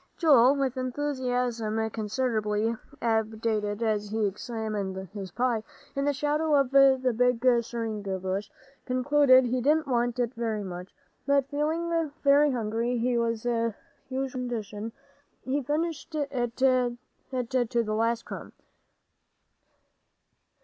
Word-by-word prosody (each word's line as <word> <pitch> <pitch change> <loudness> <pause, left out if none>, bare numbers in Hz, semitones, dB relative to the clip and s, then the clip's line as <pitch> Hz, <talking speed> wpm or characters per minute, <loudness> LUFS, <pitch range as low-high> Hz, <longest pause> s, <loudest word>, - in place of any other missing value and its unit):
Joel, 275 -5 +6
with 270 -2 -1
enthusiasm 250 -4 -1
considerably 220 -1 -1 0.3
abated 220 -1 0
as 210 -2 0
he 220 0 0
examined 210 -1 -3 0.2
his 195 -3 -6
pie 240 +3 0 0.3
in 275 0 0
the 290 - +3
shadow 295 +2 +1
of 275 -3 +2
the 265 -2 +5
big 250 0 +2 0.2
seringa 220 -4 -3
bushes, 190 +2 -3 0.4
concluded 260 0 +5
he 250 +1 0
didn't 305 +4 +3
want 240 -2 0
it 245 0 0
very 225 -4 -2
much. 180 0 -8 0.3
But 280 -1 +2
feeling 325 +2 0
very 285 +1 +5
hungry, 230 -1 -1
which 245 +1 +1
was 230 -1 -1
his 230 -2 0 0.4
usual 265 0 -2
condition, 220 -3 -4 0.5
he 275 +3 -1
finished 310 +3 -2
it 260 -5 -2
to 255 -2 +2 0.9
the 215 -1 -3
last 230 +1 0
crumb. - - -8
240 Hz, 120 wpm, -27 LUFS, 220-275 Hz, 0.9 s, Joel